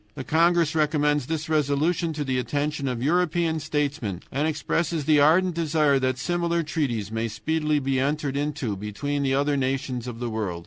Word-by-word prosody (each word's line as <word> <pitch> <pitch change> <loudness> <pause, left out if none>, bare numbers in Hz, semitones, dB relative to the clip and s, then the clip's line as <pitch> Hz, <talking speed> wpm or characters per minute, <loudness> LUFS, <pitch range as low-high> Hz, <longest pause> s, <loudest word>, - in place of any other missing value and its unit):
The - - -5
congress 165 +1 +3
recommends 150 -3 +1
this 160 0 -3
resolution 155 +3 +1
to 150 -1 -3
the 130 -2 -1
attention 145 +2 -2
of 125 -2 -2
European 170 0 +1
statesmen, 145 - -2
and 145 +4 0
expresses 160 0 -1
the 150 -1 +4
ardent 170 +5 +4
desire 155 -4 +2
that 130 -1 0
similar 170 +3 0
treaties 120 -10 -2
may 115 +1 -1
speedily 150 +8 -1
be 135 -2 0
entered 140 0 -1
into 140 -7 -2
between 105 +9 -3
the 135 -1 +1
other 145 +1 +1
nations 130 -2 -2
of 120 -2 -6
the 120 -1 -3
world. 100 -6 -3
145 Hz, 175 wpm, -25 LUFS, 130-160 Hz, -, the